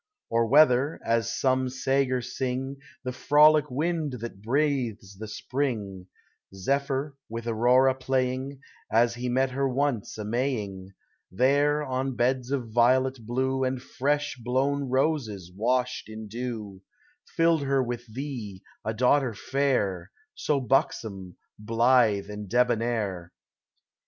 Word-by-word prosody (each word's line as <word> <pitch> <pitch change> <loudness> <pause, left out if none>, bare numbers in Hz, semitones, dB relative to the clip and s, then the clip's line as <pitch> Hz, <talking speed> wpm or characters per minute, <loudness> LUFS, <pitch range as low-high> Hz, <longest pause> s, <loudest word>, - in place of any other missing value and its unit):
Or 115 0 +2
whether 140 +2 +4
(as 115 -1 +1
some 130 -1 +1
sager 130 -1 0
sing) 130 +2 -3 0.3
The 125 - -3
frolic 150 +3 +5
wind 155 +2 -1
that 115 -5 -7
breathes 120 -5 -1
the 110 +3 -7
spring, 105 -7 -3 0.5
Zephyr, 140 +6 -1
with 115 +1 -5
Aurora 125 +3 +4
playing, 130 +1 -2
— - - -28
As 115 +1 +3
he 125 +1 -4
met 130 +2 +1
her 135 +1 0
once 130 -5 -1
a 105 - -5
Maying, 105 -6 -3 0.2
— - - -45
There, 145 +3 +3
on 130 -1 -2
beds 125 +1 0
of 130 -5 -2
violets 130 +3 +3
blue 130 +4 -1
And 130 0 -1
fresh 145 +2 -1
blown 135 +4 0
roses 125 - -1
washed 125 +3 0
in 110 0 -8
dew, 110 -4 -6 0.5
Filled 165 -2 +3
her 135 -1 +1
with 120 -1 -5
thee, 115 -7 -6 0.2
a 110 0 -3
daughter 125 0 +2
fair, 105 -10 0 0.2
So 145 -2 0
buxom, 105 -7 -1 0.3
blithe, 115 -2 +3
and 105 -1 -7
debonair. 115 -7 0
125 Hz, 125 wpm, -27 LUFS, 110-135 Hz, 0.5 s, frolic